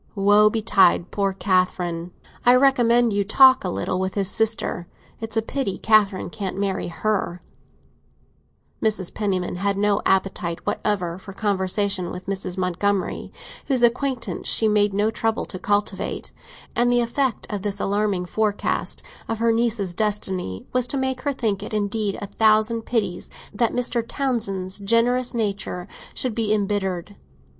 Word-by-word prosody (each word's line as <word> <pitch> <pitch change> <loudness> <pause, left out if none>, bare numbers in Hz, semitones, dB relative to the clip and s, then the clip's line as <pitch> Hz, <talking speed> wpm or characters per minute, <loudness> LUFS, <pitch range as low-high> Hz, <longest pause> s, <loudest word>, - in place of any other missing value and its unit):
Woe 205 +1 +5
betide 205 -5 +3
poor 200 -1 0
Catherine! 180 -3 0 0.3
I 245 +1 +6
recommend 240 -3 +4
you 200 0 +1
to 200 - -9
talk 260 -1 +7
a - - -1
little 100 - -2
with 190 0 -2
his 200 -1 +1
sister; 220 -6 0 0.3
it's 225 0 -5
a 225 - +2
pity 225 -5 -2
Catherine 205 -5 +2
can't 195 -2 -4
marry 195 -1 -1
her!" 180 -1 -2 1.4
Mrs. 210 -5 0
Penniman 185 -4 -2
had 200 +1 0
no 205 0 +2
appetite 190 -3 0
whatever 180 -4 -1
for 195 +1 -10
conversation 195 -2 -1
with 180 0 -7
Mrs. 190 -1 -3
Montgomery, 185 +2 -1 0.4
whose 260 -4 +1
acquaintance 250 +1 0
she 220 - +2
made 210 -1 +3
no 205 +3 +1
trouble 225 0 -1
to 185 - -5
cultivate; 205 -1 -2 0.4
and 240 +1 +3
the 245 0 +3
effect 240 +1 -1
of 205 - -2
this 205 0 -3
alarming 200 -2 0
forecast 210 +2 -1 0.3
of 225 - -1
her 230 +1 +2
niece's 225 -5 0
destiny 190 - -2
was 250 -1 +1
to 275 - -2
make 265 -1 -1
her 285 - 0
think 220 -7 -1
it 210 - -5
indeed 205 -1 -1
a - - -5
thousand 220 +2 +2
pities 215 -7 -1 0.2
that 230 +2 +1
Mr. 245 -1 0
Townsend's 205 -9 -2
generous 235 +4 +1
nature 200 -5 -2 0.3
should 255 -3 -1
be 220 -1 -1
embittered. 200 -2 -1
205 Hz, 150 wpm, -23 LUFS, 190-230 Hz, 1.4 s, talk